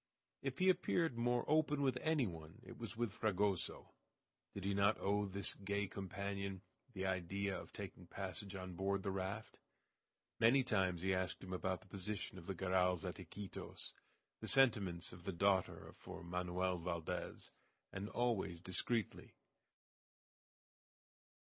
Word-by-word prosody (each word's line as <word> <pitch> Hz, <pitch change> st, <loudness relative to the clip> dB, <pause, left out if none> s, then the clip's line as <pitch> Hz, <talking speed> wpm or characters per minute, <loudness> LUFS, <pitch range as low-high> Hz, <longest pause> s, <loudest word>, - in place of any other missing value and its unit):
If 135 Hz, -1 st, -2 dB
he 185 Hz, -, +3 dB
appeared 170 Hz, -5 st, +1 dB
more 120 Hz, +1 st, +2 dB
open 150 Hz, -2 st, +3 dB
with 130 Hz, -2 st, +3 dB
any 155 Hz, -5 st, +3 dB
one, 80 Hz, -4 st, -7 dB
it -, -, -9 dB
was -, -, -5 dB
with 120 Hz, -4 st, 0 dB
Fragoso. 100 Hz, -3 st, 0 dB, 0.6 s
Did 100 Hz, -1 st, -5 dB
he 100 Hz, -, +2 dB
not 100 Hz, +2 st, +4 dB
owe 100 Hz, +1 st, +2 dB
to -, -, -8 dB
this 100 Hz, 0 st, +1 dB
gay 100 Hz, +1 st, -1 dB
companion 100 Hz, 0 st, -3 dB, 0.3 s
the 95 Hz, -1 st, -2 dB
idea 95 Hz, +1 st, 0 dB
of -, -, -7 dB
taking 90 Hz, -, -7 dB
passage 95 Hz, +1 st, -5 dB
on 95 Hz, -1 st, -5 dB
board 95 Hz, +2 st, 0 dB
the 100 Hz, -, 0 dB
raft? 95 Hz, +3 st, -3 dB, 0.8 s
Many 120 Hz, +4 st, +6 dB
times 95 Hz, -7 st, +2 dB
he 95 Hz, 0 st, +3 dB
asked 95 Hz, 0 st, -1 dB
him 95 Hz, 0 st, -5 dB
about 90 Hz, -1 st, -1 dB
the -, -, -18 dB
position 100 Hz, 0 st, -4 dB
of 85 Hz, -, -12 dB
the 95 Hz, -, -2 dB
Garrals 90 Hz, -1 st, +2 dB
at -, -, -4 dB
Iquitos, 100 Hz, -2 st, -6 dB, 0.5 s
the -, -, -5 dB
sentiments 100 Hz, -11 st, +4 dB
of 90 Hz, 0 st, -11 dB
the 95 Hz, -, -1 dB
daughter 95 Hz, +1 st, +2 dB
for -, -, -8 dB
Manoel 90 Hz, +1 st, 0 dB
Valdez, 85 Hz, 0 st, -3 dB, 0.4 s
and 100 Hz, +2 st, -3 dB
always 115 Hz, -9 st, +1 dB
discreetly. 95 Hz, +4 st, -1 dB
95 Hz, 150 wpm, -40 LUFS, 90-105 Hz, 0.8 s, Many